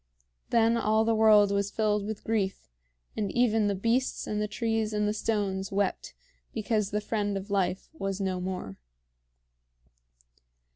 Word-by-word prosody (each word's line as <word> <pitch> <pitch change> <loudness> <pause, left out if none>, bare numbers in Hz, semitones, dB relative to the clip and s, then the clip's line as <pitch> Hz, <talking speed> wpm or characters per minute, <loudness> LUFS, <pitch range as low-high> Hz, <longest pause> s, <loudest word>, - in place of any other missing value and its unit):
Then 230 0 +3
all 220 0 +2
the 230 - +2
world 215 -2 +5
was 200 0 0
filled 210 -1 0
with 215 -1 -5
grief, 205 - -1 0.5
and 205 -3 -2
even 225 -3 +2
the 200 - 0
beasts 230 +6 0
and 210 0 -2
the 210 - 0
trees 225 -1 -1
and 210 0 +1
the 210 - 0
stones 200 -3 -1
wept 200 0 -1 0.4
because 215 -2 0
the 210 +1 -1
friend 205 -2 -1
of 195 +1 -7
life 190 -2 0
was 195 -10 -3
no 190 -2 -1
more. 180 - -5
210 Hz, 150 wpm, -28 LUFS, 195-220 Hz, 0.5 s, world